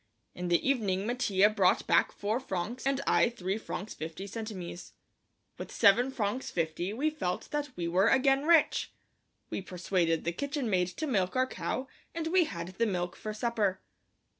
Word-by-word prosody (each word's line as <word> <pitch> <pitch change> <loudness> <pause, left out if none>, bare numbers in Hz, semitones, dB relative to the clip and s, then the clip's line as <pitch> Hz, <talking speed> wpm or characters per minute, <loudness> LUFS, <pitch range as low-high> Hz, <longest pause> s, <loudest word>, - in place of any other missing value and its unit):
In 180 0 -4
the 175 +6 +2
evening 205 -8 +1
Mattia 215 -5 +3
brought 200 -4 +2
back - - +3
four 215 +4 -1
francs 235 +3 -3
and 275 0 +1
I - - +4
three 195 -3 -3
francs 210 -1 -6
fifty 165 +4 -6
centimes. 200 -5 -7 0.7
With - - -6
seven 230 +4 +5
francs 235 0 -2
fifty 165 +2 -2
we 285 +8 0
felt 180 -13 -3
that 295 -1 -2
we 170 -1 -2
were 185 +5 +3
again 270 +3 +3
rich. 335 -3 +4 0.6
We - - -2
persuaded 180 -3 0
the 170 - 0
kitchen 280 - -3
maid 180 -2 +2
to 185 - -4
milk 195 -9 0
our 255 0 +3
cow 260 0 -4 0.3
and 330 -1 -2
we 350 +1 +3
had 170 - -5
the 230 - +3
milk 175 -3 -2
for 215 - -5
supper. 215 -4 0
210 Hz, 170 wpm, -30 LUFS, 180-260 Hz, 0.7 s, seven